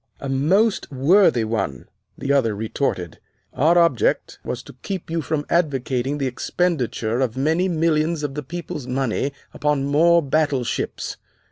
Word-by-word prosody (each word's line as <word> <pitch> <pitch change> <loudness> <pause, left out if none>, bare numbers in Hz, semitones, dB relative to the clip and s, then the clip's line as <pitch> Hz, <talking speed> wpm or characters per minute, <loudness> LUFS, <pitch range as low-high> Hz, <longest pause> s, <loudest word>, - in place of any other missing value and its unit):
"A 140 - -5
most 175 +11 +2
worthy 140 - +4
one," 100 - -3 0.3
the 140 +1 0
other 115 -7 +2
retorted. 105 - -2 0.3
"Our 165 +6 +3
object 175 - +2
was - - -4
to - - -12
keep 190 -5 -5
you 165 0 0
from 150 -1 -2
advocating 135 -4 0
the 140 - -1
expenditure 125 -4 -1
of 130 -2 -1
many 160 +7 +2
millions 160 -2 +1
of 145 -2 -2
the 150 - -4
people's 150 -2 -6
money 135 +1 -1 0.2
upon 150 -2 0
more 165 +4 +4
battleships. 140 -3 -1
145 Hz, 140 wpm, -22 LUFS, 130-165 Hz, 0.3 s, worthy